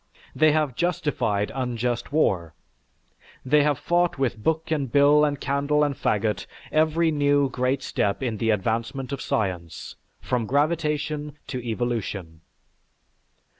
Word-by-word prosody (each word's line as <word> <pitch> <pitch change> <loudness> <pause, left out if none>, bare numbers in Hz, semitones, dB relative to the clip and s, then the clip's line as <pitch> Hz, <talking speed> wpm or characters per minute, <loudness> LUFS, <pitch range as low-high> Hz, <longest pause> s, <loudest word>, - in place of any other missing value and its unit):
They 155 -1 +5
have 150 -3 +1
justified 130 - 0
unjust 120 -2 -2
war. 95 - +1 0.9
They 150 +3 +4
have 145 -1 +2
fought 175 -1 +1
with 130 -5 -1
book 160 0 0
and 140 -6 -1
bill 145 +2 +5
and 145 -1 0
candle 145 +2 +1
and 145 -1 +1
fagot 110 -5 -1 0.2
every 160 +1 +2
new 145 -2 +2
great 125 +2 0
step 100 +6 -1
in 115 -4 -2
the 115 +2 0
advancement 115 +6 -1
of 140 - -4
science 90 -6 -3 0.2
from 120 -3 -2
gravitation 150 0 -1
to 130 -2 -3
evolution. 110 -8 -3
140 Hz, 130 wpm, -25 LUFS, 115-150 Hz, 0.9 s, They